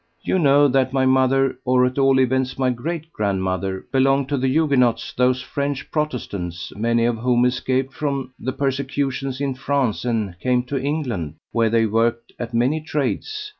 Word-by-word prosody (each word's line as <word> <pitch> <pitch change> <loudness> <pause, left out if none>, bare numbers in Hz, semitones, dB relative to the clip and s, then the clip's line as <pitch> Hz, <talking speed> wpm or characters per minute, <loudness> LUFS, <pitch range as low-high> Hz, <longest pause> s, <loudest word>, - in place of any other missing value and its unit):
"You 190 - +1
know 145 -2 +5
that 130 -1 +1
my 135 -1 +2
mother, 130 0 +2
or 125 0 +3
at 125 +2 -1
all 135 -1 +4
events 130 0 +1
my 130 -1 +2
great 160 +6 -5
grandmother, 95 -2 -2
belonged 135 0 +2
to 145 - 0
the 130 - +1
Huguenots, 130 -4 +2
those 125 0 +1
French 140 +1 -3
Protestants, 100 - -3
many 115 +2 +1
of 120 -1 0
whom 125 +1 +2
escaped 130 +1 0
from 140 -3 -3
the 130 - -2
persecutions 135 -1 -2
in 140 -1 -1
France 130 -3 -1
and 110 -7 -2
came 125 +2 +1
to 130 +1 -3
England, 125 - -3 0.2
where 115 -1 +2
they 115 0 +3
worked 115 +2 0
at 120 -1 -4
many 125 +7 +1
trades. 420 - -3
130 Hz, 170 wpm, -21 LUFS, 120-140 Hz, 0.2 s, know